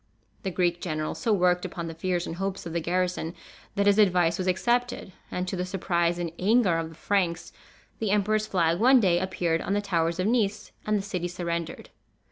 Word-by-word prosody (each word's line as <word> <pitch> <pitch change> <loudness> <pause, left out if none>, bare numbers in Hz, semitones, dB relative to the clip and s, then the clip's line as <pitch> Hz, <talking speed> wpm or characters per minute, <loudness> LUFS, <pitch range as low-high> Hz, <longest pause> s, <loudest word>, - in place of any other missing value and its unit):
The 195 - -2
Greek 175 -1 0
general 155 -3 -2
so 230 - -1
worked 180 -3 +3
upon 170 - -5
the 165 - -5
fears 175 +1 -1
and 165 - -6
hopes 195 0 -3
of 165 - -6
the 170 - 0
garrison, 180 0 -1 0.4
that 200 - +1
his 205 +1 +4
advice 180 -4 +3
was 185 - -1
accepted; 240 +2 0 0.2
and, 180 0 -3
to 185 - -2
the 180 - -2
surprise 175 -2 0
and 175 -2 -3
anger 200 -4 +3
of 165 -1 -4
the 160 - -13
Franks, 175 -2 -1 0.5
the 220 - -1
emperor's 210 +1 +1
flag 170 -3 +1
one 255 +3 +6
day 180 -5 +3
appeared 175 -3 -1
on 195 - -2
the 205 - +2
towers 170 -4 0
of 185 - +1
Nice, 215 -3 0 0.2
and 215 0 +2
the 195 - -3
city 180 -3 -3
surrendered. 170 -2 -4
180 Hz, 205 wpm, -27 LUFS, 170-200 Hz, 0.5 s, one